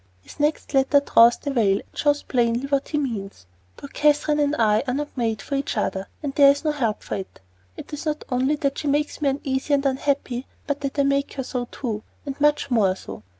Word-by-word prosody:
His -, -, -15 dB
next 295 Hz, 0 st, 0 dB
letter 270 Hz, +1 st, +4 dB
draws 235 Hz, -4 st, +5 dB
the 285 Hz, -, -4 dB
veil 205 Hz, -7 st, +2 dB
and -, -, -30 dB
shows 290 Hz, -1 st, +1 dB
plainly 240 Hz, 0 st, 0 dB
what 275 Hz, 0 st, 0 dB
he 300 Hz, -, -1 dB
means: 205 Hz, -, -4 dB, 0.3 s
Poor 280 Hz, -, -9 dB
Catherine 295 Hz, +1 st, +2 dB
and 290 Hz, 0 st, +2 dB
I 215 Hz, -3 st, +3 dB
are 250 Hz, -, 0 dB
not 295 Hz, +1 st, -4 dB
made 225 Hz, -5 st, -1 dB
for -, -, -6 dB
each 275 Hz, -4 st, -1 dB
other, 195 Hz, -2 st, -1 dB, 0.2 s
and 280 Hz, -2 st, -3 dB
there 280 Hz, 0 st, +7 dB
is 280 Hz, +2 st, +2 dB
no 305 Hz, -, +3 dB
help 235 Hz, -8 st, -2 dB
for -, -, -6 dB
it. 190 Hz, -, -8 dB, 0.4 s
It -, -, -10 dB
is 295 Hz, +2 st, -5 dB
not 305 Hz, 0 st, -2 dB
only 260 Hz, +3 st, +1 dB
that 280 Hz, -1 st, -2 dB
she 300 Hz, -, -4 dB
makes 295 Hz, +2 st, 0 dB
me 285 Hz, -, +3 dB
uneasy 270 Hz, +1 st, 0 dB
and 280 Hz, 0 st, -1 dB
unhappy, 270 Hz, -2 st, -1 dB, 0.2 s
but 285 Hz, 0 st, -2 dB
that 275 Hz, 0 st, -4 dB
I 280 Hz, -, +4 dB
make 275 Hz, 0 st, 0 dB
her 265 Hz, -, -3 dB
so, 250 Hz, -1 st, -3 dB
too 220 Hz, -5 st, -4 dB, 0.2 s
and 280 Hz, 0 st, -6 dB
much 295 Hz, -2 st, +2 dB
more 200 Hz, -6 st, +3 dB
so. 190 Hz, -, -9 dB
275 Hz, 230 wpm, -23 LUFS, 240-290 Hz, 0.4 s, there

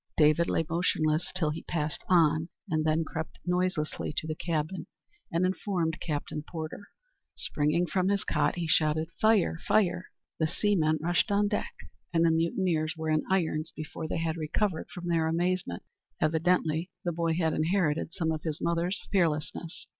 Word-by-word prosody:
David 155 Hz, +2 st, +4 dB
lay 165 Hz, -, +1 dB
motionless 160 Hz, -1 st, +1 dB
till 155 Hz, -3 st, +2 dB
he 155 Hz, -, -5 dB
passed 150 Hz, -3 st, -2 dB
on, 160 Hz, -2 st, +4 dB, 0.2 s
and 155 Hz, -4 st, 0 dB
then 155 Hz, +1 st, +2 dB
crept 160 Hz, 0 st, -5 dB
noiselessly 180 Hz, -3 st, 0 dB
to -, -, -1 dB
the 155 Hz, -, -2 dB
cabin, 160 Hz, +2 st, -2 dB, 0.4 s
and 170 Hz, +2 st, +2 dB
informed 185 Hz, -3 st, -1 dB
Captain 150 Hz, -1 st, -3 dB
Porter. 160 Hz, +5 st, -7 dB, 0.5 s
Springing 150 Hz, +4 st, +1 dB
from 180 Hz, +3 st, 0 dB
his 200 Hz, -1 st, +1 dB
cot, -, -, +1 dB
he 175 Hz, -1 st, -2 dB
shouted, 155 Hz, 0 st, +2 dB
"Fire! 215 Hz, -7 st, +4 dB
fire!" 180 Hz, -3 st, +2 dB, 0.3 s
The 160 Hz, -, +3 dB
seamen 165 Hz, -3 st, +2 dB
rushed 175 Hz, +1 st, +2 dB
on 205 Hz, +1 st, +3 dB
deck, 210 Hz, -, -2 dB, 0.4 s
and 165 Hz, -1 st, +3 dB
the 165 Hz, -, +5 dB
mutineers 165 Hz, -1 st, +1 dB
were 160 Hz, 0 st, -1 dB
in 155 Hz, 0 st, +3 dB
irons 160 Hz, -4 st, 0 dB
before 155 Hz, +1 st, -5 dB
they -, -, -2 dB
had 165 Hz, 0 st, -1 dB
recovered 160 Hz, +3 st, -1 dB
from 175 Hz, 0 st, -7 dB
their 165 Hz, -2 st, +2 dB
amazement. 175 Hz, -, -1 dB, 0.4 s
Evidently 165 Hz, +1 st, +1 dB, 0.2 s
the 175 Hz, -, +1 dB
boy 165 Hz, -1 st, 0 dB
had 160 Hz, -2 st, +1 dB
inherited 160 Hz, -2 st, +1 dB
some 170 Hz, -3 st, -1 dB
of 155 Hz, -1 st, -2 dB
his 155 Hz, -1 st, -3 dB
mother's 170 Hz, +3 st, 0 dB
fearlessness. 170 Hz, -2 st, -1 dB
165 Hz, 160 wpm, -29 LUFS, 155-180 Hz, 0.5 s, the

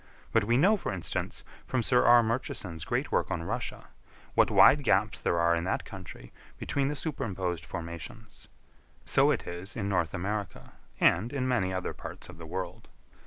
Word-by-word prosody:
But 115 Hz, -3 st, +3 dB
we 120 Hz, +3 st, +3 dB
know, 195 Hz, +10 st, +5 dB
for 180 Hz, -, -4 dB
instance, 95 Hz, -4 st, -3 dB, 0.2 s
from 130 Hz, -2 st, 0 dB
Sir 125 Hz, +1 st, +4 dB
R. 120 Hz, 0 st, +7 dB
Murchison's 100 Hz, -8 st, -3 dB
great -, -, -1 dB
work -, -, +1 dB
on 80 Hz, -, -2 dB
Russia, -, -, -4 dB, 0.4 s
what -, -, +4 dB
wide 145 Hz, +1 st, +6 dB
gaps 100 Hz, -4 st, +2 dB
there 85 Hz, -, +1 dB
are 85 Hz, 0 st, +4 dB
in 85 Hz, -, -1 dB
that 95 Hz, -, -1 dB
country 90 Hz, -11 st, -10 dB, 0.2 s
between 140 Hz, -1 st, -1 dB
the 150 Hz, -, -2 dB
superimposed 95 Hz, -, -3 dB
formations; 85 Hz, -2 st, -8 dB, 0.6 s
so -, -, +4 dB
it -, -, 0 dB
is 90 Hz, +4 st, -6 dB
in 100 Hz, -4 st, -2 dB
North 90 Hz, -4 st, 0 dB
America, 100 Hz, +2 st, -4 dB, 0.3 s
and 105 Hz, +8 st, +3 dB
in 130 Hz, -2 st, -1 dB
many 95 Hz, -8 st, +1 dB
other 95 Hz, -1 st, -3 dB
parts -, -, -9 dB
of 85 Hz, -2 st, -12 dB
the 85 Hz, -, -8 dB
world. 90 Hz, +3 st, -5 dB
95 Hz, 175 wpm, -29 LUFS, 85-120 Hz, 0.6 s, R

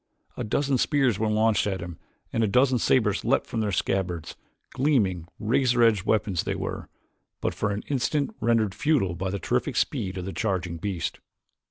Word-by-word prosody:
A -, -, -4 dB
dozen 135 Hz, +4 st, 0 dB
spears 135 Hz, -8 st, +2 dB
were 110 Hz, 0 st, +1 dB
launched 110 Hz, 0 st, +2 dB
at 95 Hz, -2 st, -2 dB
him 85 Hz, -2 st, -7 dB, 0.3 s
and 115 Hz, -, +1 dB
a -, -, +3 dB
dozen 125 Hz, +4 st, +3 dB
sabers 110 Hz, -4 st, +2 dB
leaped -, -, +2 dB
from 115 Hz, -, -4 dB
their 105 Hz, -2 st, 0 dB
scabbards; 90 Hz, -3 st, -2 dB, 0.4 s
gleaming, 105 Hz, -, +1 dB
razor 120 Hz, +2 st, +2 dB
edged 105 Hz, -4 st, +3 dB
weapons 100 Hz, -5 st, +1 dB
they -, -, -2 dB
were, -, -, -5 dB, 0.5 s
but -, -, -1 dB
for 105 Hz, -, -1 dB
the 105 Hz, -, -5 dB
instant 145 Hz, -, 0 dB
rendered 115 Hz, -4 st, +2 dB
futile 130 Hz, -, +1 dB
by 95 Hz, +2 st, -3 dB
the 100 Hz, -, -2 dB
terrific -, -, -1 dB
speed 95 Hz, -1 st, -1 dB
of 90 Hz, -, -4 dB
the 95 Hz, -, -5 dB
charging 90 Hz, -5 st, -2 dB
beast. 95 Hz, -1 st, -3 dB
105 Hz, 180 wpm, -26 LUFS, 95-125 Hz, 0.5 s, a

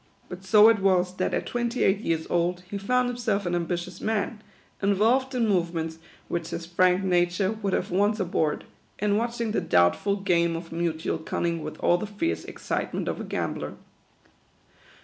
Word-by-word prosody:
But 180 Hz, +1 st, -8 dB
so 210 Hz, +3 st, +7 dB
it 225 Hz, -2 st, +5 dB
was, 185 Hz, -2 st, +2 dB
that 185 Hz, -, 0 dB
at -, -, -1 dB
twenty 240 Hz, 0 st, -1 dB
eight 195 Hz, +1 st, +3 dB
years 165 Hz, -7 st, -1 dB
old, 175 Hz, +1 st, 0 dB
he 200 Hz, +2 st, -5 dB
found 250 Hz, +5 st, +1 dB
himself 230 Hz, -5 st, -1 dB
an 175 Hz, -, -1 dB
ambitious 175 Hz, +1 st, -3 dB
man, 215 Hz, 0 st, -1 dB, 0.4 s
involved 225 Hz, +7 st, +2 dB
in 235 Hz, -2 st, +2 dB
movements 170 Hz, -4 st, -1 dB, 0.3 s
which 170 Hz, -1 st, -3 dB
his 170 Hz, -, -5 dB
frank 180 Hz, +2 st, +2 dB
nature 180 Hz, +1 st, +2 dB
THE -, -, -1 dB
QUADROONS. -, -, -11 dB
65 -, -, -16 dB
would 195 Hz, -2 st, 0 dB
have -, -, -1 dB
o 205 Hz, +3 st, +3 dB
ice 215 Hz, -, -6 dB
abhorred, 165 Hz, -5 st, 0 dB, 0.3 s
and 205 Hz, 0 st, +1 dB
watching 235 Hz, -1 st, -2 dB
the -, -, 0 dB
doubtful 85 Hz, -, +3 dB
game 170 Hz, -4 st, +1 dB
of 165 Hz, 0 st, -7 dB
mutual 165 Hz, -1 st, -2 dB
cunning 170 Hz, +1 st, -2 dB
with 155 Hz, -, -6 dB
all 175 Hz, -, +3 dB
the 215 Hz, -, -4 dB
fierce 210 Hz, -, -2 dB
excitement -, -, -3 dB
of -, -, -2 dB
a -, -, -4 dB
gambler. -, -, -3 dB
185 Hz, 190 wpm, -26 LUFS, 170-215 Hz, 0.4 s, so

